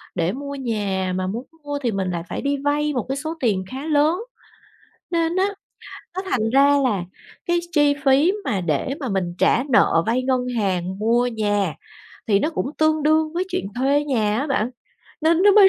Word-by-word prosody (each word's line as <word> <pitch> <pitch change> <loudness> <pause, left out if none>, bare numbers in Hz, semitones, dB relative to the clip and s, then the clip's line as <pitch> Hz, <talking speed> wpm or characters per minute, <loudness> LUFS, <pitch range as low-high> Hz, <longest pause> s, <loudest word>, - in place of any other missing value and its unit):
để 170 +1 +1
mua 280 +2 -6
nhà, 200 -7 -2
mà 185 0 -1
muốn 230 +7 -4 0.2
mua 290 0 -3
thì 235 - +1
mình 190 -2 -2
lại 170 -1 -3
phải - - -4
đi 280 0 0
vay 295 +1 +1
một 245 -5 -2
cái 270 - 0
số 315 +3 -3
tiền 205 -7 +1
khá 270 +3 -5
lớn. 305 +2 +3 1.0
Nên 335 0 0
á 380 +1 +3 0.7
nó 375 - -2
thành 225 -2 +1
ra 280 +3 +5
là 200 -8 0 0.4
cái 345 0 +2
chi 290 -3 +4
phí 280 +7 +5
mà 205 -8 0
để 170 - -1
mà 270 - -3
mình 185 -4 -1
trả 245 - +3
nợ 165 -8 +4
vay 240 +3 +1
ngân 255 -1 +1 0.2
hàng 190 -2 -1
mua 235 +3 +2
nhà 205 - 0 0.5
thì 200 -3 +4
nó 300 - 0
cũng 280 -4 -2
tương 310 -1 +2
đương 310 +1 +2
với 360 +2 -1
chuyện 365 - -2
thuê 280 +3 +2
nhà 220 -6 +1
á 290 - -2
bạn, 250 -4 0 0.5
nên 330 +3 +3
nó 410 -1 +7
mới 400 -2 +8
260 Hz, 200 wpm, -22 LUFS, 205-295 Hz, 1.0 s, mới